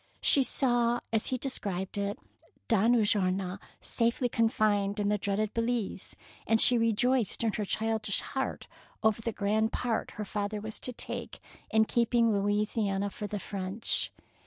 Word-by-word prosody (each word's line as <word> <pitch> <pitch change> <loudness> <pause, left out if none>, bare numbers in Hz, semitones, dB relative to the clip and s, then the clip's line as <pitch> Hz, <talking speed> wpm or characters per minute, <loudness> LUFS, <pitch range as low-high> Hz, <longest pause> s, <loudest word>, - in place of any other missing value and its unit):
She 280 - +5
saw, 240 -2 +1
as 220 - +1
he 255 - -1
described 200 -8 -1
it, 200 0 -2 0.5
Don 225 +2 +4
Ulloa 195 -3 +1 0.2
safely 235 +3 +1
confined 215 -3 +1
in 205 0 +1
the 210 0 +1
dreaded 200 +2 -1
Belize, 230 -4 -2 0.3
and 225 +1 +3
she 245 - +8
rejoiced 230 0 +2
in 220 -2 +1
her 210 - -2
childish 220 0 0
heart 265 0 -4 0.4
over 220 0 +2
the 230 - -2
grand 215 +2 0
part 235 -3 -2
her 210 - -3
father 205 +1 -3
was 220 +1 -5
to 250 - -3
take 245 - -5 0.3
in 220 0 +4
keeping 235 0 +2
Louisiana 205 0 0
for 210 - -6
the 205 - -4
French. 195 +2 -1
215 Hz, 150 wpm, -29 LUFS, 205-230 Hz, 0.5 s, she